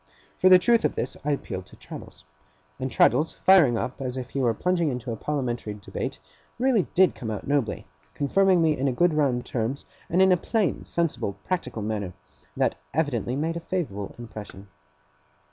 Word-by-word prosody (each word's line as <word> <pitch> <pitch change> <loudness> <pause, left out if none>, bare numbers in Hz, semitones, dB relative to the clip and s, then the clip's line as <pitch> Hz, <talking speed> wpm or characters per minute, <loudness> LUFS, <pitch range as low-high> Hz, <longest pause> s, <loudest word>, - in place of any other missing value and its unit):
For 185 - +6
the 185 - +10
truth 230 +6 +3
of - - +1
this, 120 - -3
I 150 - -1
appealed 95 -10 -3
to - - -15
Traddles. - - -11 0.6
And 130 - -2
Traddles, 155 +4 +3
firing 170 -11 +6
up 130 +4 -4
as 130 -1 -3
if 130 -1 -6
he 140 - -2
were 125 -3 +3
plunging 175 +3 +1
into 125 -2 -4
a - - -2
Parliamentary 120 -5 -3
Debate, 100 - -5 0.4
really 240 -6 +2
did 185 0 +5
come 115 - -6
out 105 -2 -4
nobly: 140 -6 0 0.3
confirming 185 +4 +3
me 155 -2 +3
in 135 0 0
good 175 +4 +3
round 135 -5 +1
terms, 125 +4 -3 0.2
and 175 - +1
in 190 0 +6
a 180 - +5
plain 210 +2 -1
sensible 165 -11 -1
practical 125 - -3
manner, 105 -4 -3 0.4
that - - +1 0.2
evidently 130 -6 0
made 160 +4 -1
a - - -2
favourable 150 - -4
impression. 105 -4 -9
140 Hz, 180 wpm, -26 LUFS, 115-175 Hz, 0.6 s, the